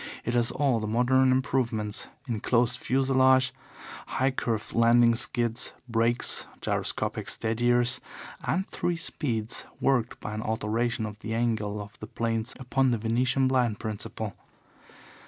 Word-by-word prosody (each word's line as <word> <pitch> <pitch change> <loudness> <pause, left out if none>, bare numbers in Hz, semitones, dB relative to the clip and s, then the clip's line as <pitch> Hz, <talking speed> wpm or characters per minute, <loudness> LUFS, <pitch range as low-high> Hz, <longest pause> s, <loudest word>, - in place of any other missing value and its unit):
It 120 - -1
has 120 -1 +3
all 135 -5 +1
the 110 - -3
modern 130 +4 +3
improvements 120 -5 0 0.2
enclosed 120 +1 +1
fuselage, 130 0 +3 0.5
high 130 +1 +1
curved 115 -4 -3
landing 115 0 +5
skids, 120 -1 0
brakes, 115 +1 +1
gyroscopic - - -2
steadiers, 120 +3 +3 0.4
and 160 +9 0
three 175 -2 -2
speeds, 115 -9 -2 0.2
worked 125 -4 +1
by 105 - -6
an 110 - -3
alteration 110 +1 -1
of 105 -1 -7
the 110 +1 -4
angle 110 -3 -1
of 105 0 -10
the 110 - -7
planes 115 +1 -2
upon 130 +1 +1
the 120 - +1
Venetian 120 +4 +1
blind 125 -5 +1
principle. 110 0 -4
120 Hz, 130 wpm, -27 LUFS, 110-130 Hz, 0.5 s, landing